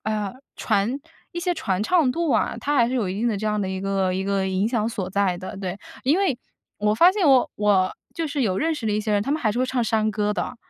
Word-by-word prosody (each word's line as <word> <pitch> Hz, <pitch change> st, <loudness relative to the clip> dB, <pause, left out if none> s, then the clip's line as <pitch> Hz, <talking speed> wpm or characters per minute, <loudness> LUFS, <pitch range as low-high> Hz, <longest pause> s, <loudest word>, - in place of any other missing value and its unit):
哎 215 Hz, -, -1 dB
呀， 210 Hz, -2 st, -2 dB, 0.2 s
传 225 Hz, +8 st, 0 dB, 0.3 s
一 345 Hz, -, -4 dB
些 355 Hz, +1 st, 0 dB
传 210 Hz, -, -1 dB
唱 310 Hz, +1 st, +3 dB
度 330 Hz, +2 st, -1 dB
啊， -, -, +1 dB
它 290 Hz, +1 st, -1 dB
还 235 Hz, -3 st, +4 dB
是 255 Hz, -, -2 dB
有 215 Hz, -8 st, 0 dB
一 -, -, -3 dB
定 240 Hz, -, +2 dB
的 215 Hz, -, -1 dB
这 215 Hz, +2 st, -3 dB
样 210 Hz, -1 st, 0 dB
的 190 Hz, -, -2 dB
一 190 Hz, 0 st, -3 dB
个 195 Hz, -1 st, 0 dB
一 190 Hz, +1 st, -2 dB
个 195 Hz, -1 st, 0 dB
影 190 Hz, +2 st, 0 dB
响 225 Hz, -2 st, 0 dB
所 195 Hz, -5 st, -4 dB
在 195 Hz, -2 st, +1 dB
的。 185 Hz, +4 st, -7 dB
对， 190 Hz, 0 st, -4 dB, 0.2 s
因 290 Hz, +7 st, +3 dB
为 375 Hz, -11 st, +1 dB, 0.4 s
我 210 Hz, 0 st, +2 dB
发 345 Hz, +11 st, +6 dB
现 390 Hz, -7 st, +2 dB
我 260 Hz, -2 st, +5 dB
我 200 Hz, -3 st, +2 dB, 0.2 s
就 330 Hz, -, -2 dB
是 285 Hz, -1 st, -3 dB
有 200 Hz, -7 st, +1 dB
认 320 Hz, +8 st, +1 dB
识 230 Hz, -7 st, -5 dB
的 210 Hz, -, +1 dB
一 210 Hz, -, +1 dB
些 215 Hz, 0 st, -1 dB
人， 205 Hz, 0 st, +2 dB
他 275 Hz, -, -3 dB
们 305 Hz, -, +1 dB
还 215 Hz, -3 st, +2 dB
是 235 Hz, -, -3 dB
会 255 Hz, -, +1 dB
唱 255 Hz, -2 st, 0 dB
山 220 Hz, -1 st, +1 dB
歌 210 Hz, 0 st, 0 dB
的。 215 Hz, -, -4 dB
215 Hz, 305 characters per minute, -23 LUFS, 195-265 Hz, 0.4 s, 发